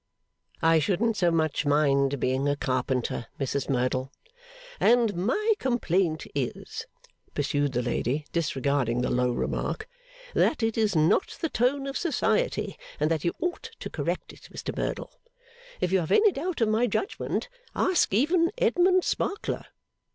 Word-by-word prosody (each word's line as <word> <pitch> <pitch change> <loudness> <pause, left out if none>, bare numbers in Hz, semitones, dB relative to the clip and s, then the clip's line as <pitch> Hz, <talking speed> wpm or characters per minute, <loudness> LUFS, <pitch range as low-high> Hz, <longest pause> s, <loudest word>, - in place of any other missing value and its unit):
'I 165 0 +5
shouldn't 210 +7 +1
so 180 -4 +3
much 160 -3 +1
mind 140 -2 +2
being 130 +3 +1
a 145 - +2
carpenter, 130 -3 -1
Mrs 135 0 -2
Merdle.' 130 0 0 0.7
'And 235 -4 +4
my 335 - +2
complaint 185 - 0
is,' 135 -4 -4 0.5
pursued 145 -1 0
the 125 0 0
lady, 125 +4 -1
disregarding 140 -6 0
the - - 0
low 125 0 +2
remark, 430 - -2 0.5
'that 275 - +2
it 225 -1 +1
is 215 -4 +1
not 155 - +2
the 325 - -1
tone 270 +3 +1
of 275 0 -3
Society, 480 +9 0 0.2
and 155 - +1
that 160 -3 0
you 170 - +1
ought 355 +6 -3
to - - -6
correct - - -3
it, - - -15
Mr - - -5
Merdle. - - -3 0.7
If 180 - +1
you 190 - +4
have 165 - -3
any 430 -1 +6
doubt 340 -1 -3
of 225 - +3
my 225 +3 +2
judgment, 395 - -2 0.3
ask 370 -1 +2
even 330 - +3
Edmund 370 -4 +3
Sparkler. 405 +2 -2
170 Hz, 150 wpm, -27 LUFS, -, 0.7 s, any